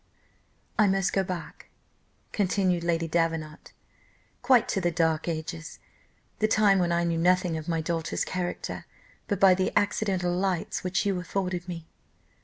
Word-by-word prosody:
"I 215 - +6
must 195 -1 +1
go 195 - +2
back," 180 -3 -7 0.6
continued 185 -3 +1
Lady 165 -1 0
Davenant, 165 -2 -2 0.7
"quite 250 -2 +4
to 195 - 0
the 175 - +2
dark 160 -1 0
ages, 160 0 -5 0.6
the 215 - +3
time 210 -3 +4
when 175 -1 +1
I 170 0 +2
knew 170 -1 0
nothing 180 0 +2
of 155 -1 -5
my 165 -1 0
daughter's 165 0 -2
character 180 -1 -4 0.4
but 205 -3 -1
by 195 -2 +7
the 185 +1 0
accidental 195 -3 +1
lights 185 -2 -1
which 185 +2 0
you 195 -3 0
afforded 180 -1 -3
me. 170 -2 -6
180 Hz, 150 wpm, -27 LUFS, 165-195 Hz, 0.7 s, by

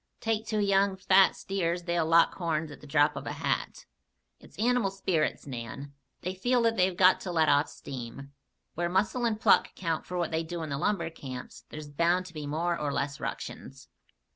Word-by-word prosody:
Take 225 -1 -1
two 215 - -1
young, 200 -1 +3
fat 190 0 +5
steers 175 -3 -2
they'll 170 -2 0
lock 165 +1 +5
horns 160 -3 -2
at - - -12
the 150 - -12
drop 145 +1 +3
of - - -6
a - - -3
hat. - - -2 0.5
It's - - -17
animal 240 -2 +2
spirits, 190 -4 -1
Nan. 135 +2 -7 0.3
They 185 - -3
feel 245 +6 +1
that 230 0 +2
they've 185 -2 +2
got 185 0 +6
to 185 - -4
let 160 -3 +3
off 145 +1 +3
steam. 135 +2 -8 0.4
Where 175 +1 -1
muscle 205 +7 +1
and 220 -2 0
pluck - - +4
count 165 -3 -2
for 180 - -4
what 170 -2 -1
they 160 0 0
do 165 0 -5
in 155 - -5
the 140 - -2
lumber 170 -3 0
camps, 130 -5 -9
there's 150 -1 -8
bound 170 +5 +1
to 180 - -11
be 150 -2 -6
more 170 +4 0
or 150 -3 -2
less 140 0 -2
ructions." - - -7
170 Hz, 200 wpm, -29 LUFS, 150-195 Hz, 0.5 s, got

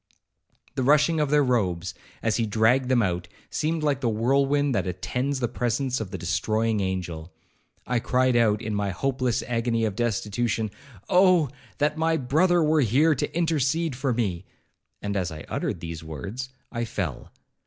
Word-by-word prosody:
The 135 - -2
rushing 150 +4 +4
of 150 -2 +1
their 150 0 +4
robes, 95 -9 0 0.3
as 110 -1 +1
he 115 -2 0
dragged 115 +5 +3
them 125 -3 +4
out, 90 -2 -1 0.2
seemed 160 +1 -1
like 140 -3 +1
the 120 - +1
whirlwind 135 +5 +2
that 100 -4 0
attends 125 +10 -2
the 120 - 0
presence 125 +2 -1
of 105 - -4
the - - -5
destroying 110 0 0
angel. 90 -3 -3 0.5
I 125 0 +1
cried 130 +1 +2
out, 110 -3 +3
in 110 - -3
my 100 -1 0
hopeless 130 +6 -1
agony 115 -1 0
of 105 -3 -2
destitution, 110 -1 -1 0.4
'Oh! 180 -5 +5 0.3
that 150 +2 0
my 160 0 +2
brother 165 +6 +3
were 155 0 +3
here 140 +7 +4
to 150 - -3
intercede 160 -2 +1
for 130 +1 -1
me,'—and, 100 -1 -5
as 90 -3 -1
I 80 -1 -7
uttered 85 - -3
these 80 -1 -6
words, 100 - -6 0.2
I 120 -1 -2
fell. 95 - -4
120 Hz, 165 wpm, -25 LUFS, 105-140 Hz, 0.5 s, Oh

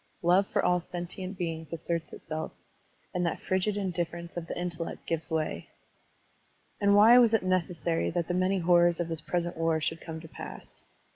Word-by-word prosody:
Love 180 +3 +4
for - - 0
all 180 0 +3
sentient 180 +2 -6
beings 160 -3 -4
asserts 165 0 -3
itself, 155 0 -5 0.6
and 180 - 0
that 170 - -1
frigid 190 +2 0
indifference 170 -3 -3
of 170 -1 -5
the - - -5
intellect 170 -1 -4
gives 165 0 -2
way. 155 - -2 1.1
And 200 0 +4
why 225 +4 +8
was 230 -2 +5
it 220 - +1
necessary 175 -2 0
that 170 -1 -1
the 175 - -1
many 185 +2 +2
horrors 175 -1 +4
of 170 -1 -1
this 165 -2 -3
present 175 +1 -2
war 165 -1 +1
should 160 +2 -2
come 160 -1 -6
to 160 - -11
pass? - - -10
175 Hz, 180 wpm, -29 LUFS, 165-185 Hz, 1.1 s, why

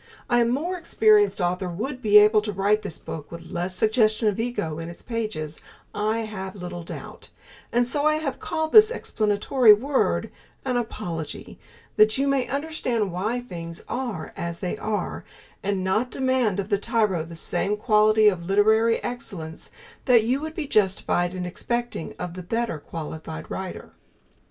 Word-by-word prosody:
A 240 0 +5
more 300 +10 -1
experienced 420 - +4
author 180 +1 -1
would 250 +10 -4
be 210 -3 +6
able 210 +1 +6
to 210 0 -3
write 205 +2 +2
this 200 -6 -6
book 150 -2 -8
with 170 0 -9
less 180 +2 -3
suggestion 220 0 +2
of 205 - -3
ego 195 -10 -2
in 165 0 -5
its 170 - -11
pages, 215 -10 -4 0.3
I 215 +2 0
have 190 -3 -6
little 175 -2 -6
doubt, 165 - -9 0.4
and 240 +1 +3
so 290 +4 0
I 305 - +3
have 310 -4 -3
called 315 -1 -2
this 430 0 +9
explanatory 215 - +3
word 265 +6 0 0.3
An 255 -2 0
Apology 170 -9 -4 0.4
that 215 +2 +5
you 275 +1 +1
may 275 -2 +1
understand 270 - -1
why 215 +8 -2
things 170 -7 -8
are 235 -11 -4
as 170 0 -4
they 180 -1 -3
are, 215 -1 -3 0.4
and 195 -1 -1
not 215 +7 +1
demand 260 -7 +1
of 200 +1 -3
the 200 - +2
tyro 210 -6 +1
the 165 +1 -10
same 185 +5 -1
quality 215 -1 +4
of 185 -4 +2
literary 220 +3 +4
excellence 190 -10 -6 0.4
that 240 -3 +5
you 255 +5 0
would 315 0 -5
be 320 - -3
justified 190 -5 +1
in 180 -1 -3
expecting 235 +2 -3
of 180 - -5
the 185 - -7
better 225 -2 -2
qualified 155 - -7
writer. - - -6
215 Hz, 165 wpm, -25 LUFS, 180-245 Hz, 0.4 s, this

